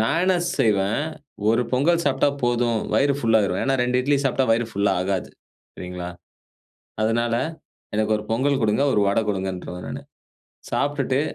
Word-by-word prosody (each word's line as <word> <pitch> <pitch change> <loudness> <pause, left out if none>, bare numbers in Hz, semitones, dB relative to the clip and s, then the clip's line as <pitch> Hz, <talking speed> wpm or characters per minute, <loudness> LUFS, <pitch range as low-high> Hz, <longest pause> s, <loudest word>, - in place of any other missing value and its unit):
நான் 140 +9 +2
என்ன 185 - +3 0.2
செய்வேன், 105 +2 +2 0.5
ஒரு 115 +2 +3
பொங்கல் 165 +7 +3
சாப்ட்டா 135 +1 +3
போதும், 120 -1 +1 0.2
வயிறு 140 0 +3
ஃபுல் 115 -3 +3
ஆயிரும். 95 -3 0
ஏன்னா 135 0 +1
2 125 0 +1
இட்லி 140 +2 +2
சாப்ட்டா 135 0 +2
வயிறு 115 +1 +1
ஃபுல்லா 100 0 +1
ஆகாது. 95 0 -2 0.5
சரிங்களா. 90 -1 -6 0.9
அதனால 115 +1 +1 0.6
எனக்கு 110 0 +1
1 105 - -5
பொங்கல் 135 +4 +1
கொடுங்க, 110 +5 +2
1 105 - +3
வட 100 - +1
கொடுங்கன்றுவேன் 95 -2 -4
நானு. - - -6 0.7
சாப்ட்டுட்டு 140 -2 0
115 Hz, 150 wpm, -23 LUFS, 100-135 Hz, 0.9 s, என்ன